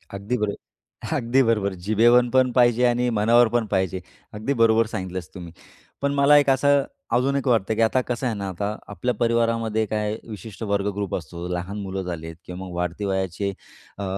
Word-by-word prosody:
अगदी 105 +6 -2
बरो 105 -1 -1 0.6
अगदी 130 +1 +2
बरोबर. 105 -4 +1
जिभेवर 120 +3 +4
पण 130 -1 +4
पाहिजे 120 0 +4
आणि 120 0 +2
मनावर 120 +2 +5
पण 120 - +2
पाहिजे. 95 -1 0 0.3
अगदी 110 +7 -2
बरोबर 115 0 +5
सांगितलंस 95 -4 -5
तुम्ही. 85 -3 -9 0.5
पण 140 0 0
मला 140 +1 +5
एक 145 -1 +4
असं 140 +1 +3 0.3
अजून 135 +3 +2
एक 140 -1 -1
वाटतं, 110 -3 +2
की 115 - 0
आता 115 +3 +3
कसं 120 +1 -3
आहे 115 - -1
ना, 100 -1 -4
आता 100 +4 -3
आपल्या 125 +5 -2
परिवारामध्ये 115 -1 +1
काही 105 +1 -2
विशिष्ट 105 +1 -8
वर्ग 100 -1 0
ग्रुप 100 -2 -2
असतो. 85 +2 -6
लहान 90 +4 -4
मुलं 95 0 -4
झाली 85 -3 -5
आहेत 80 0 -8
किंवा 90 0 -8
मग 90 - -9
वाढती 90 +3 -3
वयाचे 95 0 -1 0.5
अ, 100 - -5
110 Hz, 185 wpm, -23 LUFS, 95-120 Hz, 0.6 s, मनावर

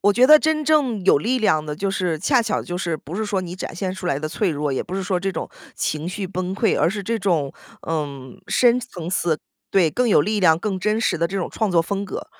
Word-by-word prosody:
我 205 +1 +4
觉 250 +4 +5
得 305 +2 +9
真 310 0 0
正 275 -10 +2
有 180 - +5
力 250 - 0
量 155 -9 +2
的 150 -1 -4
就 195 +5 -1
是 180 -5 -1
恰 245 - +2
巧 225 -2 -1
就 175 - -5
是， 170 -3 -2
不 155 +3 -10
是 220 +3 -1
说 200 -2 -1
你 180 -1 -6
展 185 - -6
现 185 +1 -3
出 185 -1 -6
来 140 -5 0
的 155 +1 -4
脆 190 +3 0
弱， 145 -2 -2
也 130 - -1
不 185 - -7
是 195 - -2
说 185 -1 -1
这 195 +1 -1
种 - - -5 0.3
情 155 +3 -2
绪 195 +1 -4
崩 185 0 -3
溃， 220 +3 +1
而 170 - +3
是 210 - -4
这 230 +4 -1
种， 165 -8 0 0.3
呃， 155 -2 -1 0.4
深 245 0 +4
层 180 -9 -7
次 170 -4 0 0.3
对， 185 -4 +4
更 245 +4 +1
有 195 - +5
力 210 +5 0
量、 165 -3 +5
更 195 -1 -2
真 215 +2 +1
实 230 - +1
的 170 +1 0
这 195 - -4
种 180 - -2
创 220 -3 -1
作 170 -2 +4
风 200 +4 -3
格， 195 - -6
190 Hz, 285 characters per minute, -22 LUFS, 170-215 Hz, 0.4 s, 得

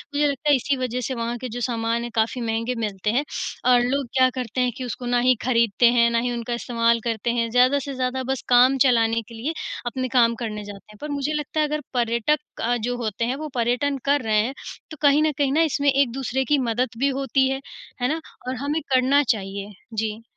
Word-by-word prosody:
मुझे 295 +1 +3
लगता 285 +1 -1
है 290 - +7
इसी 270 +2 0
वज़ह 250 -1 -2
से 265 - -3
वहाँ 235 0 -3
के 255 - -4
जो 245 +2 -5
सामान 230 -1 -1
हैं 240 - -5
काफ़ी 225 +3 0
महँगे 230 +2 -1
मिलते 210 -2 -2
हैं 255 +6 +1 0.5
और 245 - +6
लोग 270 +3 0
क्या 255 0 +6
करते 255 0 -2
हैं 250 0 +1
कि 260 - -5
उसको 245 +1 -6
ना 245 0 +2
ही 255 +1 +4
खरीदते 235 -2 +3
हैं, 235 -1 +4
ना 230 - +2
ही 245 +1 -1
उनका 240 0 -3
इस्तेमाल 235 -1 +1
करते 230 0 -2
हैं। 230 -1 0
ज़्यादा 255 +4 +4
से 280 0 -6
ज़्यादा 260 0 -2
बस 265 -1 -2
काम 250 +2 +6
चलाने 230 -2 +3
के - - -9
लिए 260 +9 -3 0.3
अपने 255 +2 -2
काम 235 -1 +5
करने 210 -2 -4
जाते 205 0 -11
हैं। 210 - -15
पर 300 - -5
मुझे 285 +1 -2
लगता 300 +1 -3
है 305 - +3
अगर 300 0 -2
पर्यटक 235 +4 +1 0.2
अ, 240 +2 +1
जो 245 +2 -2
होते 230 -1 -2
हैं 250 +3 -1
वो 305 +2 -5
पर्यटन 250 +4 0
कर 285 0 +3
रहे 215 -2 +2
हैं, 245 +5 -2 0.4
तो 310 - -8
कहीं 290 +1 +5
न 310 - +2
कहीं 280 -2 +1
ना 315 - +3
इसमें 285 +1 +2
एक-दूसरे 265 -1 0
की - - +5
मदद 245 +3 0
भी 275 +2 +3
होती 270 0 +2
है, 270 0 -2 0.4
है 245 - +2
ना? 325 - -4 0.3
और 255 - -2
हमें 300 +3 0
करना 260 +3 +4
चाहिए। 200 0 -6 0.2
जी। 220 0 -3
245 Hz, 235 wpm, -23 LUFS, 230-270 Hz, 0.5 s, है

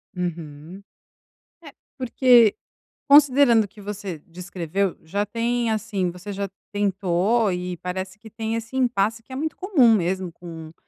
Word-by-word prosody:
Uhum. 170 0 -6 0.8
É, 290 -3 -12 0.2
porque 245 -3 +4 0.5
considerando 280 -5 +6
o - - -7
que 205 +2 -16
você 200 -4 -6
descreveu, 180 +2 -3
já 200 +6 -2
tem, 235 +2 -1
assim, 205 -4 -1
você 185 +4 -8
já 200 0 -4 0.2
tentou 200 +2 +1
e 180 0 -4
parece 185 +3 -5
que 220 - -13
tem 220 +1 -4
esse 230 +2 -6
impasse 230 -3 0
que 260 - -19
é - - -5
muito 310 +4 -3
comum 310 - +4
mesmo 185 0 -1
com 165 -2 -10
205 Hz, 145 wpm, -23 LUFS, 180-230 Hz, 0.8 s, considerando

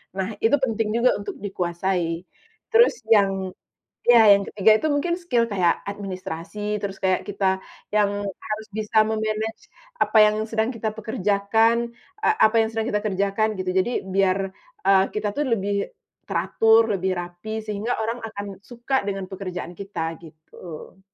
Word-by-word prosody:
Nah, 190 -1 -1
itu 225 +5 +4
penting 225 -3 0
juga 240 +2 +4
untuk 205 - -6
dikuasai. 175 -3 -2 0.5
Terus 465 +2 +6 0.2
yang 200 -3 +6 0.7
iya, 240 -1 +7 0.2
yang 200 - -3
ketiga 210 +1 +3
itu 315 - -1
mungkin 340 +4 0
skill 245 -10 +1
kaya 185 -4 +3 0.2
administrasi, 190 -2 -6 0.2
terus 195 -1 -4
kaya 185 -1 +3
kita 200 -1 -3 0.5
yang 210 -1 +4 0.4
harus 215 +1 -4
bisa 215 0 -1
me-manage 220 0 -2 0.4
apa 220 - +1
yang 210 - -2
sedang 220 +1 0
kita 220 -1 -2
pekerjakan, 220 +2 +2 0.4
eee, 435 0 +3
apa 220 +1 +2
yang 220 - 0
sedang 225 0 -2
kita 210 - +1
kerjakan 200 +2 +1
gitu, 185 -1 -3
jadi 215 +6 0
biar, 190 0 +2 0.5
eee, 195 -1 +6
kita 210 0 -1
tuh 295 - +1
lebih 200 +1 -2 0.6
teratur, 225 0 +4
lebih 190 -1 0
rapi, 175 +6 -6
sehingga 215 +3 -2
orang 230 +2 -2
akan 205 -2 -6 0.2
suka 245 +2 -1
dengan 195 -1 -3
pekerjaan 180 -2 -6
kita, 170 -5 -4
gitu. 160 +2 -12
205 Hz, 150 wpm, -23 LUFS, 190-225 Hz, 0.7 s, iya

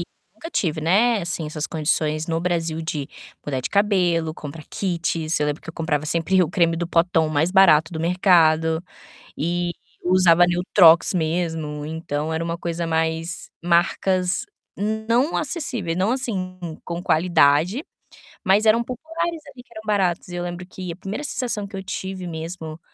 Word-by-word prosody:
eu - - 0 0.3
nunca 325 +10 -9
tive, 160 - -1
né, 210 +8 +3
assim, 170 -2 -3
essas 155 0 -3
condições 155 0 0
no 165 -1 -1
Brasil 165 -2 -1
de 150 -3 -4 0.4
mudar 135 -3 -1
de 125 - -4
cabelo, 180 -6 +2
comprar 150 +1 -9
kits. 170 -3 -1
Eu 150 - +1
lembro 150 0 -3
que 155 - -16
eu - - -5
comprava 155 -2 -1
sempre 170 +4 +2
o 165 - -1
creme 170 -2 +2
do 170 +1 -2
potão 165 -2 +2
mais 155 +3 +1
barato 175 -5 +5
do 160 - -4
mercado 165 -2 +3 0.6
e 175 +2 -1 0.3
usava 175 -1 +5
Neutrox 175 0 +5
mesmo, 160 -3 -2
então, 155 -1 -3
era 160 +1 -1
uma 170 0 -3
coisa 170 0 -3
mais 160 +1 -2
marcas 180 +1 +1 0.4
não 220 - 0
acessíveis, 255 - -2
não, 190 +5 +1
assim, 190 -8 -3 0.2
com 170 0 -5
qualidade, 170 - +3 0.6
mas 200 +3 +4
eram 225 +2 +4
populares, 325 +7 -4
ali, 270 -3 -12
que - - -36
eram 220 - -8
baratos. 195 -6 0
E 175 - -6
eu 175 - -3
lembro 175 +1 -5
que 185 0 -7
a - - -10
primeira 195 +8 -5
sensação 240 -8 -2
que 200 0 -9
eu 190 - -5
tive 190 -1 -5
mesmo 160 -1 -6
175 Hz, 165 wpm, -22 LUFS, 160-190 Hz, 0.6 s, barato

